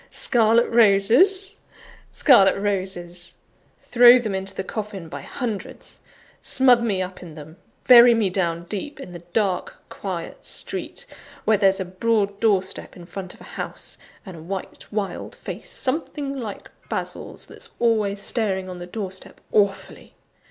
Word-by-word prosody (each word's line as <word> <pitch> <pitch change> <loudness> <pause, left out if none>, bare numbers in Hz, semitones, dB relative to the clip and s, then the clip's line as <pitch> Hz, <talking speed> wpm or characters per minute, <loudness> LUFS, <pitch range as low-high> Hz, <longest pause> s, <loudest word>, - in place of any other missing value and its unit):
Scarlet 230 -1 +3
roses! 235 - +5 0.5
scarlet 195 -9 +5
roses! 185 -3 -2 0.4
throw 245 0 +6
them 220 -5 -3
into 190 0 -4
the 190 - -3
coffin 205 -4 -6
by 140 -2 -7
hundreds; 225 - -6 0.4
smother 250 -2 +4
me 200 -5 0
up 185 0 -8
in 165 -4 -11
them; 155 +2 -12 0.3
bury 240 -1 +9
me 220 -3 +1
down 170 -3 -1
deep; 215 +11 -6
in 270 - -9
the 175 - -8
dark, 195 -3 -1
quiet - - -6
street 485 - -7 0.4
where 220 - +4
there's 195 -1 +3
a 190 - -2
broad 200 +2 -1
door 205 -4 +3
step 190 - -6
in 175 - -12
front 185 0 -8
of - - -20
a - - -12
house, - - -7 0.3
and 190 -3 -9
a 160 - -11
white, 190 +3 -7
wild 200 -4 -4
face, - - -8
something 280 0 -3
like 225 -7 -7 0.2
Basil's, - - -5
that's 465 - -11
always 215 -4 +1
staring 200 -3 -1
on 180 -1 -8
the 175 - -8
doorstep 190 -1 -7
awfully. 195 -2 -1
200 Hz, 150 wpm, -23 LUFS, 185-235 Hz, 0.5 s, bury